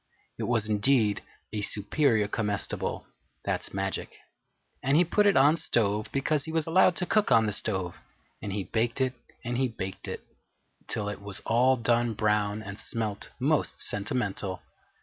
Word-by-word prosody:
It - - -1
was 115 -3 +1
indeed 105 0 +2 0.3
a 105 - -1
Superior 105 +2 +1
Comestible 105 -1 -2 0.4
(that's - - -1
magic), 95 0 -3 0.6
and 135 +3 +3
he 175 - +5
put 205 +5 +3
it 200 - +4
on 145 +4 +6
stove 105 -7 0
because 140 +1 0
he 160 - -5
was 160 -1 +1
allowed 180 +1 +4
to 180 - 0
cook 215 +3 +2
on 115 -1 +6
the 105 - 0
stove, 95 -4 -1 0.4
and 105 - -4
he 100 0 -2
baked 115 +7 -1
it 130 -1 +1 0.3
and 120 +1 -1
he 130 - +3
baked 95 -4 -6
it - - -6 0.6
till 105 -3 -2
it 105 -1 -5
was 100 -1 -5
all 125 +3 +3
done 120 -1 +1
brown 105 0 +1
and 100 0 -8
smelt 110 -3 -3
most - - +1
sentimental. 100 -4 -2
110 Hz, 165 wpm, -28 LUFS, 100-130 Hz, 0.6 s, on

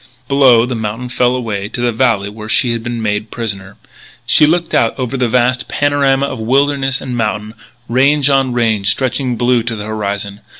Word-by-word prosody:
Below 130 -4 +5
the 125 - -4
mountain 115 +2 -4
fell 125 0 +1
away 105 -5 -3
to - - -6
the 120 0 +1
valley 115 -4 +1
where 110 +1 -9
she 120 +1 +2
had 115 -1 -2
been 120 -1 -4
made 105 0 -2
prisoner. 100 -5 -6 0.5
She 150 - +5
looked 170 +2 0
out 115 - +2
over 130 -1 -3
the 125 -2 0
vast 125 +2 +1
panorama 140 -1 +1
of 130 -3 -5
wilderness 135 +3 +1
and 125 -2 -5
mountain, 105 -1 -2 0.3
range 140 +3 +2
on 135 -2 +2
range 110 -4 0
stretching 130 0 0
blue 120 +1 +2
to 115 0 -4
the 105 -1 -6
horizon. 100 -2 -4
120 Hz, 185 wpm, -15 LUFS, 110-130 Hz, 0.5 s, Below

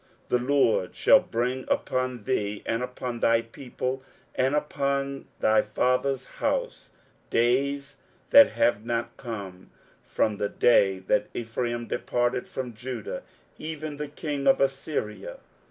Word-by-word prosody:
23:007:017 125 - +4
The 140 - +2
LORD 115 -9 +2
shall - - +6
bring 125 +3 -2
upon 130 -3 -1
thee, 105 -5 -1
and 115 +1 -1
upon 125 -1 -4
thy 115 0 +3
people, 130 +2 -5 0.3
and 130 +3 +1
upon 140 -2 -1
thy 110 0 +4
father's 125 +4 0
house, - - -3 0.4
days 140 +4 +1 0.3
that 285 0 +8
have 110 -3 +2
not 120 0 -2
come, 100 -7 -7 0.3
from 105 -2 0
the 100 0 -1
day 100 -5 +4
that 100 +2 0
Ephraim 120 +1 -2
departed 120 +1 -1
from 125 -2 -5
Judah; 120 0 -5 0.4
even 155 -1 -5
the 150 0 -4
king 145 -1 -4
of 135 - +5
Assyria. 135 -7 -2
125 Hz, 130 wpm, -26 LUFS, 115-135 Hz, 0.4 s, that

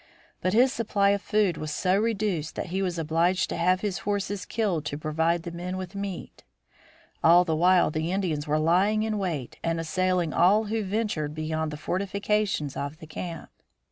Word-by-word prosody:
But 185 - 0
his 250 +4 +4
supply 205 -3 +1
of 200 -1 0
food 205 -7 +1
was 155 - -4
so 185 +4 +1
reduced 205 -7 -1
that - - -4
he 190 - 0
was 180 -3 -1
obliged 165 +3 +1
to - - -3
have 180 +2 +2
his 205 -4 -2
horses 205 -1 -2
killed 200 -9 -1
to 145 - -3
provide 160 +2 0
the 170 - -6
men 180 +2 -5
with 185 0 -6
meat. 200 -2 -6 0.8
All 175 +2 +7
the 160 -2 0
while 180 +1 +4
the 160 +2 -2
Indians 170 -6 -1
were 150 +1 +2
lying 185 +7 +3
in 215 -1 -1
wait 160 -10 -4
and 165 0 0
assailing 175 0 0
all 195 +6 +4
who 220 +1 -2
ventured 195 -7 -2
beyond 155 0 -2
the 150 - -6
fortifications 200 -2 -1
of 140 +2 -4
the 160 - -11
camp. 165 +1 -7
180 Hz, 185 wpm, -26 LUFS, 160-200 Hz, 0.8 s, All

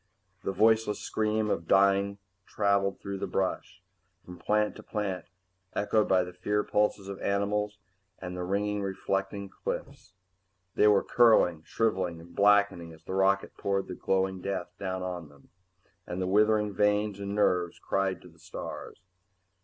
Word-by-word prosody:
The - - -1
voiceless 110 +2 +3
scream 110 -1 0
of 85 - -2
dying 100 +1 +3 0.3
traveled 100 -1 +1
through 100 -1 -5
the - - -3
brush, 95 -1 -2 0.4
from 90 -1 -11
plant 105 0 +1
to - - -9
plant, 100 -4 -3 0.5
echoed 105 +1 +2
by 95 -1 +4
the 90 0 -8
fear 105 +4 0
pulses 105 -1 0
of 100 -1 -6
the - - -9
animals 105 +1 0 0.4
and 90 -1 -6
the 90 - -3
ringingly 100 +2 -1
reflecting 95 +1 -2
cliffs. 95 0 -6 0.6
They 105 - +4
were 105 -2 +5
curling, 110 -9 +4
shriveling 95 -7 -1
and 85 +1 -14
blackening 100 -4 +3
as 80 0 -17
the 95 - -6
rocket 95 +1 +2
poured 100 -1 -1
the - - -5
glowing 95 0 0
death 95 -2 -3
down 95 -1 -3
on 90 -4 -5
them, 70 -1 -21 0.6
and 90 - -4
the 95 - 0
withering 105 +2 +3
veins 105 0 +1
and 100 0 -4
nerves 90 -4 +1
cried 95 -2 -1
to - - -12
the 85 -1 -19
stars. - - -8
100 Hz, 160 wpm, -29 LUFS, 90-105 Hz, 0.6 s, were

